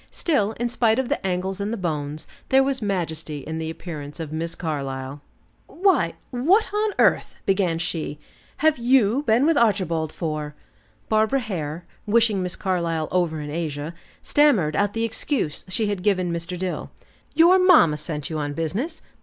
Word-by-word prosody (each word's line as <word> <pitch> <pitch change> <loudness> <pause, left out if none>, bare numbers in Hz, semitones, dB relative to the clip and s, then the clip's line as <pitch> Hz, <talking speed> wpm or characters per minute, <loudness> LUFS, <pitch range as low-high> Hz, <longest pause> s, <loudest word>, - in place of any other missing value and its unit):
Still, 220 - 0
in 240 +2 -2
spite 230 -1 +2
of 265 -1 -1
the 290 - -1
angles 190 +2 -2
and 205 +2 -2
the 230 - -2
bones, 155 -4 -3 0.2
there 265 0 +5
was 270 -2 -1
majesty 160 -7 -3
in 160 +3 -5
the 160 0 -3
appearance 155 -3 -7
of 160 -2 -5
Miss 165 +1 -3
Carlyle. 140 -3 -4 0.5
"Why 380 +1 +2 0.2
what 330 - +3
on 420 0 +1
earth!" - - +3
began 190 -4 +1
she, 165 -3 -3 0.5
"have 315 -5 +4
you 245 0 +3
been 230 +5 +4
with 325 0 +3
Archibald 180 -8 +1
for?" 155 -2 -4 0.5
Barbara 220 +5 +2
Hare, 170 -6 -4 0.2
wishing 220 -2 +3
Miss 180 0 -2
Carlyle 170 -4 -1
over 170 -4 0
in 145 0 -6
Asia, 155 -1 -3 0.3
stammered 220 - +3
out 205 +2 +1
the 225 - -1
excuse 230 - -2
she 215 +4 -1
had 205 -3 -2
given 185 -3 +1
Mr. 170 +2 -4
Dill. 185 0 -3 0.5
"Your 345 +4 +6
mamma 320 - +6
sent 150 -1 -5
you 160 -1 -3
on 145 -1 -2
business! 200 - -3
185 Hz, 165 wpm, -23 LUFS, 160-235 Hz, 0.5 s, Your